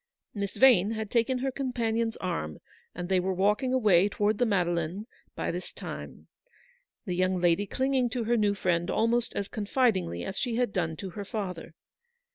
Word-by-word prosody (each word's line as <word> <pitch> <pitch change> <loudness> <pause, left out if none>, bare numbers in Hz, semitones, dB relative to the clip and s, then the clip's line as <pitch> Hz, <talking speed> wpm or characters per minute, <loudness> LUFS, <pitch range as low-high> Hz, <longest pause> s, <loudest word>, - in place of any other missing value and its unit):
Miss 200 -2 -4
Yane 225 -5 +5
had 220 -2 -4
taken 240 +2 +2
her 265 +1 -1
companion's 230 -4 -1
arm, 165 - -3 0.4
and 175 0 -4
they 190 0 +2
were 185 +1 -1
walking 210 +7 +2
away 205 -7 +4
towards 205 +1 0
the 245 - +3
Made 195 -5 +2
leine 170 +4 -2 0.3
by - - -2
this - - -5
time; - - -8 0.8
the 180 - -2
young 185 +1 +1
lady 175 +3 +2
clinging 260 +1 +1
to 235 +1 -2
her 235 +2 +1
new 205 -3 +2
friend 175 -2 0
almost 235 +1 +1
as 200 - -2
confidingly 205 - 0
as 195 - -4
she 240 -3 -1
had 245 -3 0
done 165 -3 -1
to 190 -2 -6
her 200 +4 -6
father. 185 -5 -5
205 Hz, 180 wpm, -28 LUFS, 180-235 Hz, 0.8 s, Yane